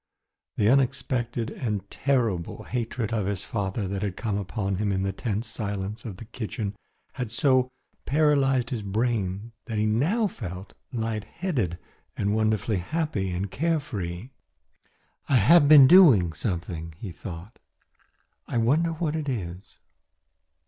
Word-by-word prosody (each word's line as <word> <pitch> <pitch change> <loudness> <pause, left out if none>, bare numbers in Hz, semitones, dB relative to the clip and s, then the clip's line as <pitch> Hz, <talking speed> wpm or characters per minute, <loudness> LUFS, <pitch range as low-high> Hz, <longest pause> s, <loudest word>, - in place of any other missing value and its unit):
The 105 - +2
unexpected 125 -2 +1
and 105 -6 -3
terrible 115 -11 0
hatred 115 -2 -3
of 105 -4 0
his 100 -1 -2
father 100 -1 -2
that 100 0 -3
had 100 -3 -3
come 110 -4 -2
upon 100 -1 -2
him 105 0 0
in 95 0 0
the 95 - 0
tense 105 +2 -3
silence 105 -1 -4
of 105 -5 -5
the 115 - -9
kitchen 110 -2 -4 0.4
had 125 -4 -4
so 130 +2 +3 0.4
paralysed 135 -4 +3
his 120 -4 -2
brain 105 0 -1
that 110 - -4
he 105 - +2
now 150 - +2
felt 95 - -6 0.2
light 110 -3 -2
headed 125 - -2 0.4
and 100 +1 0
wonderfully 110 -1 +1
happy 105 - -2
and 95 +2 -3
carefree. 120 - -2 1.0
"I 140 - +4
have 145 - +6
been 145 -3 +10
doing 130 - +7
something," 85 -2 -4
he 100 -1 -6
thought; 90 +4 -9 0.9
"I - - -2
wonder 150 +9 +2
what 160 -1 -2
it 155 -3 -2
is." 95 -6 -6
110 Hz, 140 wpm, -26 LUFS, 95-130 Hz, 1.0 s, been